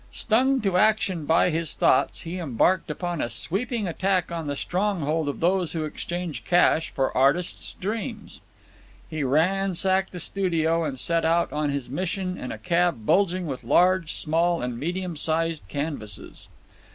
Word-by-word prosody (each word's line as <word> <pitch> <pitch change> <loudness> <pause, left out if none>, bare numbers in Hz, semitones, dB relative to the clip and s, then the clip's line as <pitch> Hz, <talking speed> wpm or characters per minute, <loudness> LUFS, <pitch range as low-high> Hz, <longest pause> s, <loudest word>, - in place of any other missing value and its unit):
Stung 260 +4 +2
to 195 -4 +1
action 195 -6 +2
by 165 +2 +4
his 165 -1 -1
thoughts, - - +2
he 170 +2 -5
embarked 165 +4 +1
upon 175 +1 -3
a 120 - -1
sweeping 215 - -2
attack 185 0 0
on 165 -2 -4
the 145 - -2
stronghold 165 -4 -1
of 145 - -5
those 180 0 +2
who 160 -2 -2
exchange 170 +1 -5
cash 170 -2 +3
for 135 -1 -1
artists' 140 +7 +1
dreams. 215 +3 -5 0.7
He 155 -2 -2
ransacked 190 +6 +1
the 180 - -7
studio 165 -3 0
and 140 -3 -3
set 165 +5 +1
out 170 +1 +1
on 150 0 0
his 140 -3 -3
mission 185 +5 -3
in - - -6
a - - -5
cab 175 -9 0
bulging 180 - +2
with 130 -5 -5
large, 180 +5 +3
small, 165 +2 +1
and 125 -1 -4
medium 175 +3 -3
sized 160 +1 -1
canvases. 140 -9 -6
170 Hz, 155 wpm, -25 LUFS, 155-185 Hz, 0.7 s, by